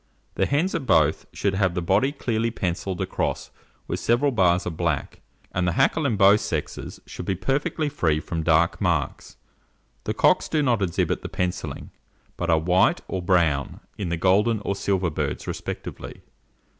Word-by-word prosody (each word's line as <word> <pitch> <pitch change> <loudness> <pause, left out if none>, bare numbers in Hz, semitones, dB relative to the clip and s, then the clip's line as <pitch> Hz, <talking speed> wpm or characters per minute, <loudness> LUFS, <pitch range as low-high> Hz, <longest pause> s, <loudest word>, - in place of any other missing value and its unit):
The - - +1
hens 155 +7 +1
of 130 - -3
both 80 -3 +3
should 100 - -1
have 95 -2 +1
the - - 0
body 100 +10 +2
clearly 115 -5 -1
pencilled 95 -3 -3
across - - -2 0.4
with - - -2
several 125 +5 +2
bars 90 -6 +2
of 90 - -4
black, 80 -4 -2 0.3
and 90 0 0
the 90 - +1
hackle 155 - +2
in 115 - 0
both, 100 +1 +5
sexes - - -4
should 90 - -8
be 95 - +1
perfectly 140 - -1
free 80 - +1
from 80 +1 -4
dark 80 +1 +2
marks. - - -1 0.7
The - - -2
cocks - - +3
do 155 -2 +1
not 120 -6 +2
exhibit 90 -3 0
the - - -6
pencillings, 90 -1 -4 0.4
but 85 - -3
are 80 - +5
white 90 +4 +3
or 95 - -3
brown 85 -6 +1 0.2
in 100 -4 -4
the 85 - -1
golden 105 +6 +3
or 100 - -2
silver 95 -3 0
birds - - -3
respectively. - - -6
95 Hz, 170 wpm, -24 LUFS, 85-115 Hz, 0.7 s, both